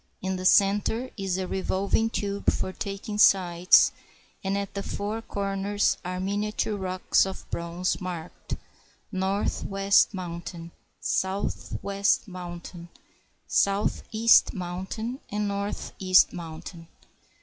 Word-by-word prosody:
In 190 0 -2
the 185 0 -5
center 205 +6 +3
is 195 -3 -2
a 190 - -2
revolving 195 +4 0
tube 200 -2 0
for 185 - -3
taking 200 +2 -5
sights, 180 -3 +6 0.5
and 195 +1 0
at 200 -1 -4
the 200 - -3
four 210 +3 -3
corners 200 -1 0
are 180 0 -3
miniature 205 +2 -1
rocks 185 -1 +1
of 190 - -7
bronze 170 +3 -2
marked 175 -2 -5 0.6
"Northwest 195 +1 +2
Mountain," 170 -1 -6 0.3
"Southwest 200 +1 0
Mountain," 175 -1 -8 0.6
"Southeast 215 +3 +3
Moun 180 0 -4
tain," 235 +5 -4
"Northeast 200 -2 +2
Mountain." 165 0 -8
195 Hz, 105 wpm, -27 LUFS, 185-200 Hz, 0.6 s, sights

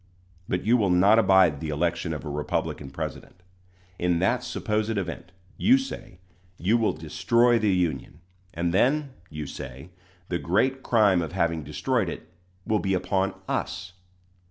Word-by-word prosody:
But 90 +1 -1
you 120 +3 +4
will 100 -5 +1
not 95 +5 +5
abide 95 -7 +4
the 80 - -5
election 85 +2 -1
of 75 -4 -5
a - - -5
Republican 75 -1 -3
president! 90 +6 -7 0.6
In 90 -1 +1
that 115 +8 +1
supposed 110 0 -2
event, 90 -2 -5 0.3
you 255 +4 +5
say, 265 - -7 0.4
you 100 +7 +2
will 115 -2 +2
destroy 120 0 +2
the 110 -2 +1
Union; 80 -6 -1 0.3
and 85 +1 -2
then, 140 +8 +2 0.2
you 75 -1 -6
say, 65 +4 -9 0.4
the 85 - -2
great 130 +10 +1
crime 105 -8 +3
of 85 - -5
having 85 -3 0
destroyed 100 - -1
it 85 +1 -9 0.3
will 110 -1 +1
be 95 -1 0
upon 95 +1 0
us! 90 +1 -3
90 Hz, 155 wpm, -26 LUFS, 85-110 Hz, 0.6 s, not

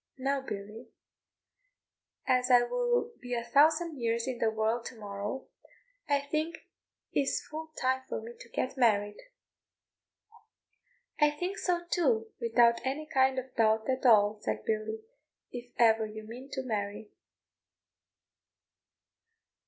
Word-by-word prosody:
Now 275 +1 0
Billy, 210 -1 -7 1.4
as 255 0 +2
I 245 -1 +7
will 485 - 0
be 245 0 -3
a 235 - -2
thousand 305 +5 +3
years 230 0 0
in 250 -2 -3
the 225 - +3
world 220 +2 0
to - - -7
morrow, 205 +4 -5 0.6
I 285 -1 +3
think 310 +3 -3 0.5
it - - +2
is 275 - -1
full 315 +1 -7
time 260 0 +1
for - - -2
me 225 +2 -8
to 235 - -12
get 255 +3 -3
married." 205 -3 +2 2.0
"I 300 -1 +6
think 360 +7 -4
so 345 -1 0
too, 240 -11 +1
without 235 0 +4
any 275 +4 -2
kind 265 -2 +2
of 260 0 -5
doubt 220 -1 +2
at 260 - -2
all," 215 -3 +5
said 110 0 -3
Billy, 220 0 -2 0.5
"if 245 0 -8
ever 225 -2 +4
you 215 0 -8
mean 245 +5 -9
to 265 - -2
marry." 210 -3 -4
245 Hz, 135 wpm, -30 LUFS, 220-275 Hz, 2.0 s, I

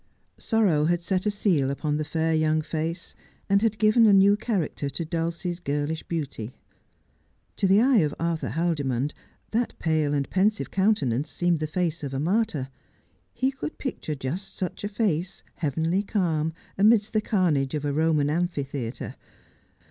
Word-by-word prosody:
Sorrow 195 -10 +2
had 175 +1 +1
set 185 +2 0
a - - +4
seal 185 -10 +1
upon 150 +2 -1
the 155 - -1
fair 160 +1 0
young 155 0 +2
face, 165 +3 -4 0.3
and 200 0 +3
had 220 -1 +1
given 220 +1 +5
a 205 - +6
new 195 +1 +6
character 195 -10 -2
to 160 +5 -3
Dulcie's 170 +2 -3
girlish 150 0 -2
beauty. 140 -8 -5 1.0
To 195 - +2
the 195 +3 +5
eye 260 0 +4
of 150 -4 +1
Arthur 165 -1 -1
Haldimond 145 -5 -1 0.4
that 235 +2 -1
pale 155 -3 +1
and 140 -1 0
pensive 205 +3 +1
counte 195 -2 +2
nance 125 +6 -1
seemed 175 -2 0
the 155 - -2
face 165 0 -2
of 135 -1 -4
a - - -1
martyr. 160 - 0 0.6
He 260 +3 0
could 270 +3 -6
picture 200 - -4
just 145 +9 -5
such 185 +1 -4
a 205 - -2
face, 190 -4 -1
heavenly 160 +5 0
calm, 165 -7 0 0.3
amidst 215 +1 +4
the 215 - +2
carnage 155 -11 +1
of 150 -1 -3
a 145 - 0
Roman 155 -1 +2
amphi 170 -2 0
theatre. 135 -4 -5
165 Hz, 165 wpm, -26 LUFS, 150-200 Hz, 1.0 s, a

